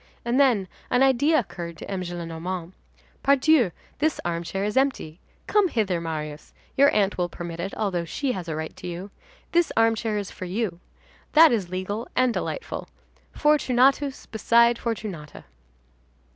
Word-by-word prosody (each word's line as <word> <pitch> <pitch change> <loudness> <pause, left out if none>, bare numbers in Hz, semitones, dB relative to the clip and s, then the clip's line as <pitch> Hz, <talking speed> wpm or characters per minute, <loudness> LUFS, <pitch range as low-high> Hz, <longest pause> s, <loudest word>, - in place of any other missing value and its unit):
And 240 +3 +1
then, 240 -9 +3 0.2
an 250 +1 +3
idea 285 +4 +4
occurred 170 - -4
to - - -9
M. 190 -1 -2
Gillenormand.—"Pardieu, 180 - -1 0.3
this 310 +2 +1
armchair 175 +3 -2
is 210 +2 -2
empty. 265 - 0 0.3
Come 415 -2 +3
hither, 200 - 0
Marius. 155 -2 -5 0.2
Your 280 +1 +6
aunt 200 -2 +1
will 175 -1 0
permit 170 -1 -7
it, 195 +3 -3
although 190 -5 -1
she 265 - -2
has 185 -6 -5
a 160 - -3
right 160 0 -5
to 180 0 -8
you. 180 +3 -6 0.4
This 345 -1 +2
armchair 225 -1 +2
is 200 -2 -4
for 185 - -7
you. 185 -1 -2 0.5
That 320 0 +8
is 205 -7 0
legal 185 +5 -4
and 255 -2 +3
delightful. - - -4 0.5
Fortunatus 275 -1 +2
beside 235 +2 +3
Fortunata." 205 -10 -5
205 Hz, 145 wpm, -25 LUFS, 175-255 Hz, 0.5 s, That